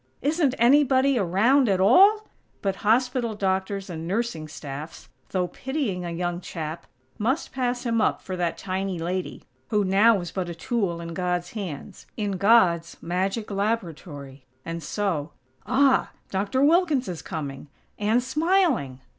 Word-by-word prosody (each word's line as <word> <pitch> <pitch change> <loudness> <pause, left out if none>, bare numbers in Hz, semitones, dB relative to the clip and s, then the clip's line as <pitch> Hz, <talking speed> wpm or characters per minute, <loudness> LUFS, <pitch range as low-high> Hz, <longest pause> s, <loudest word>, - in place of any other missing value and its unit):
Isn't 290 -2 +2
anybody 265 +1 +4
around, 220 +8 +3
at 190 -2 +2
all? 395 - +6 0.4
But 195 -1 -1
hospital 240 +1 +1
doctors 195 0 -1
and 165 -2 -6
nursing 190 -6 -2
staffs, 150 +1 -8 0.2
though 180 -2 0
pitying 260 - -3
a - - -3
young 175 +1 -3
chap, 160 -2 -6 0.3
must 255 +9 -1
pass 250 -1 -2
him 230 -2 +1
up - - +1
for 185 - -6
that 175 -2 -1
tiny 190 -1 -3
lady, 180 +2 -4 0.3
who 210 -1 +2
now 200 +4 +5
was 175 -3 -5
but 185 -2 -3
a 170 - -6
tool 175 -2 -2
in 170 0 -6
God's 180 0 -2
hands; 185 -10 -7
in 205 -2 -1
God's 180 -5 +3
magic 195 +5 -2
laboratory. 165 - -3 0.2
And 165 0 -4
so 165 -2 -2 0.3
Ah!! 265 +3 +3 0.2
Doctor 200 +7 0
Wilkins 310 -4 +3
is 175 -3 -5
coming 145 -2 -6 0.3
_and 220 +4 +2
smiling!! 300 - +1
195 Hz, 145 wpm, -25 LUFS, 175-245 Hz, 0.4 s, all